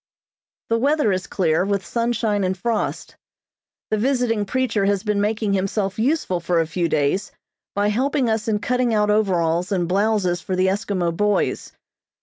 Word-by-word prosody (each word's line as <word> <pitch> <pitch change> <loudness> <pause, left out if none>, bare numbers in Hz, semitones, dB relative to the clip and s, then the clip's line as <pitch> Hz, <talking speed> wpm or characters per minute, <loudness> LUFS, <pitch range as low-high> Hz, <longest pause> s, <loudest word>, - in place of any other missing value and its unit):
The 230 0 +2
weather 285 -3 +2
is 185 0 -2
clear, 165 -2 +1
with 200 -1 -1
sunshine 230 -3 0
and 185 +1 -1
frost. 225 +2 -2 0.8
The 215 - +1
visiting 245 -4 +1
preacher 245 -3 0
has 200 -1 +1
been 210 -2 0
making 210 0 0
himself 195 +1 -1
useful 245 - 0
for 170 0 0
a 165 - +2
few 170 +1 -1
days 150 +9 0 0.4
by 205 +1 +2
helping 260 +4 +1
us 220 -1 -1
in 215 -2 +1
cutting 245 +2 0
out 210 0 +2
overalls 180 -4 +1
and 180 -3 0
blouses 195 -2 +1
for 185 - -3
the 185 +1 +2
Eskimo 190 -3 -1
boys. 210 +2 0
205 Hz, 160 wpm, -22 LUFS, 185-225 Hz, 0.8 s, The